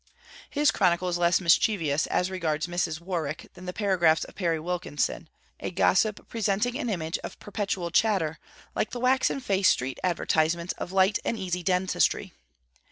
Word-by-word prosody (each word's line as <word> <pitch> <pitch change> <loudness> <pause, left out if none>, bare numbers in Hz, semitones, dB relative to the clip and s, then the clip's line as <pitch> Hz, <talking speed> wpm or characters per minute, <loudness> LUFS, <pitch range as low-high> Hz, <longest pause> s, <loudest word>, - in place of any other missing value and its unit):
His 295 +1 +3
chronicle 180 -2 +2
is 175 0 -1
less 175 0 +3
mischievous 165 -4 +2
as 180 +1 0
regards 160 -5 -1
Mrs. 175 -2 -2
Warwick 170 -4 -4
than 180 0 -11
the - - -2
paragraphs 180 -6 +2
of - - -10
Perry 170 -4 -1
Wilkinson, 170 -1 -2 0.3
a - - -3
gossip 195 +3 +1
presenting 225 +2 0
an 245 - -2
image 165 -5 -2
of - - -8
perpetual 195 -4 -3
chatter, 170 -6 +1 0.3
like - - -1
the 245 - -5
waxen 260 +2 +2
faced 195 -7 +3
street 130 +1 -4
advertizements 170 -1 +1
of 180 - -5
light 190 +2 +3
and 230 - -1
easy 180 -3 -2
dentistry. 180 +1 +1
180 Hz, 160 wpm, -27 LUFS, 170-200 Hz, 0.3 s, His